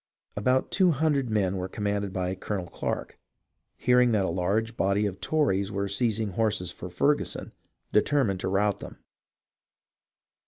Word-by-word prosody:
About 130 +6 +1
two 190 -2 +4
hundred 145 -4 +1
men 95 -3 0
commanded 100 0 -2
by 95 0 -2
Colonel 95 0 -4
Clarke, 85 - -4 0.6
hearing 125 -1 +4
that 100 -3 +2
a - - -1
large 100 +6 0
body 100 +1 +1
of 100 -2 -4
Tories 100 -11 +1
were 100 0 -1
seizing 110 +1 0
horses 105 -2 0
for 90 - -8
Ferguson, 145 +12 0 0.4
determined 105 -4 +2
to - - -2
rout 100 +1 +1
them. - - -9
105 Hz, 135 wpm, -27 LUFS, 95-120 Hz, 0.6 s, two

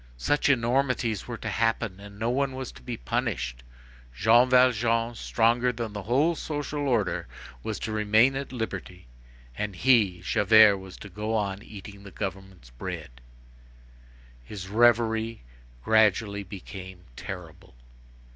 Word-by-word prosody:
such 145 - +1
enormities 125 -4 +1
were 120 -2 -5
to 115 - -7
happen 115 -2 -1
and 100 0 -12
no 115 +3 -1
one 135 +1 0
was 130 -1 -5
to - - -15
be 120 -2 -5
punished! 105 - -2 0.5
Jean 120 - +5
Valjean, 120 -2 +3
stronger 120 +2 +1
than 115 -3 -5
the 105 - -5
whole 135 - +2
social 145 -2 -3
order, 115 -7 0 0.3
was 110 - -4
to 110 - -4
remain 110 +5 +3
at 135 -1 -4
liberty, 105 - -6 0.5
and 105 +3 -4
he, 105 -5 +3
Javert, 105 +1 +5
was 95 -1 -11
to - - -10
go 105 +4 -3
on 100 -2 -2
eating 100 -1 -11
the 100 - -11
government's 95 - -7
bread! - - -7 1.2
His 95 - -8
reverie 115 - +2 0.4
gradually 105 - +3
became 95 -1 -10
terrible. 85 -7 -9
110 Hz, 135 wpm, -27 LUFS, 100-120 Hz, 1.2 s, Jean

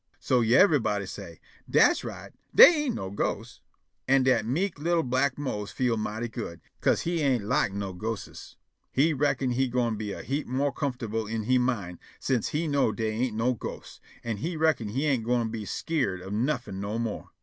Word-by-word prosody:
So 125 -1 +2
yiver'body 120 - +3
say': - - -9 0.3
"Das - - +4
right; - - -8 0.2
dey 340 -10 +8
ain' 250 - -1
no 95 - -5
ghosts." 100 - -3 0.5
An' 135 0 +4
dat 125 -4 +2
mek' 170 +6 -1
li'l' 170 +2 +1
black 130 +2 0
Mose 105 -8 -4
feel 125 -3 0
mighty 110 +2 -3
good, 110 -8 -6 0.2
'ca'se - - +2
he 170 0 -1
ain' 125 -8 +1
lak 100 - +2 0.3
ghostes. 110 0 -6 0.4
He 155 +5 +3
reckon' 140 -2 0
he 130 +2 +1
gwine 120 -3 0
be 105 -1 -4
a - - -6
heap 140 +3 -2
mo' 140 +3 0
comfortable 115 -7 -3
in 110 0 -3
he 125 +3 +3
mind 105 -9 -2 0.2
sence 125 -5 0
he 160 +2 -1
know' 140 -6 +2
dey 110 0 -2
ain' 115 0 -2
no 125 +3 +2
ghosts, 120 - -8 0.2
an' 115 -3 -3
he 165 - -3
reckon' 155 -9 +1
he 135 +8 -1
ain' 135 -5 +2
gwine 120 0 0
be 110 -2 -5
skeered 130 - -1
of 95 +2 -6
nuffin' 120 -4 -1
never 100 +1 -3
no - - -1
more. 115 -2 -4
125 Hz, 190 wpm, -27 LUFS, 110-140 Hz, 0.5 s, dey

